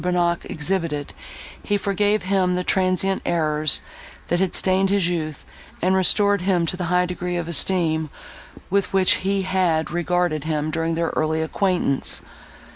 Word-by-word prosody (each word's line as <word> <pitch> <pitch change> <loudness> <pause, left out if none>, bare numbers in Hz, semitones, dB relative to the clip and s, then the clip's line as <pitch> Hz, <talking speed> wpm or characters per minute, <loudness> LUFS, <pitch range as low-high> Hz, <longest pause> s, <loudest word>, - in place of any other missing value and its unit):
Bonnac 175 -1 0
exhibited, 155 -3 -2 0.5
he 205 - 0
forgave 205 +1 0
him 185 -1 +1
the 180 - -1
transient 190 +1 +1
errors, 155 -3 +1 0.5
that 175 - +1
had 190 -1 +1
stained 190 +1 +2
his 195 -3 +2
youth, 155 -4 -4 0.3
and 185 +1 +2
restored 200 +1 +3
him 180 -2 +1
to 165 - -1
the 180 -1 -3
high 180 +1 +2
degree 180 0 -4
of 170 -2 -3
esteem, 160 -1 +1 0.6
with 200 0 +1
which 190 -1 +4
he 195 0 0
had 180 -4 0
regarded 175 -3 0
him, 155 -1 -1
during 165 0 -1
their 165 0 0
early 160 0 0
acquaintance. 175 -5 -1
180 Hz, 150 wpm, -22 LUFS, 160-190 Hz, 0.6 s, which